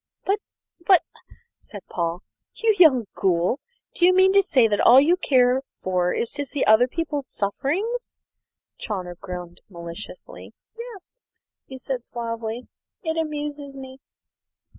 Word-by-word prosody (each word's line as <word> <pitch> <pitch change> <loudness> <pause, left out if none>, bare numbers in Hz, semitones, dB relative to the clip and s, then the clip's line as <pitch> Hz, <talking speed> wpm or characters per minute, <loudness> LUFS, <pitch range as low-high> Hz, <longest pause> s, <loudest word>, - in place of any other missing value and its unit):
"But 400 +2 +1 0.4
but," 365 -1 +5 0.6
said 205 -4 -9
Paul, 170 +1 -3 0.3
"you 450 -1 +2
young 265 -9 +6
ghoul, 180 +6 +1 0.3
do - - -3
you 365 +1 +6
mean 380 +1 +5
to 400 - +6
say 260 -11 +3
that 205 -2 0
all 250 +2 +8
you 320 +6 +4
care 255 -6 +3 0.2
for 180 -1 0
is 230 - -2
to 285 - -3
see 280 0 -2
other 220 +4 +5
people's 295 -1 -3
sufferings?" 375 - -2 0.7
Chawner 185 -5 -4
grinned 175 -1 -8
maliciously. 170 - -10 0.2
"Yes," 470 0 -11 0.5
he 265 - -9
said 255 -1 -4
suavely; 230 0 -5 0.4
"it 320 -2 -1
amuses 295 -3 -4
me." 265 0 -10
260 Hz, 135 wpm, -23 LUFS, 210-330 Hz, 0.7 s, all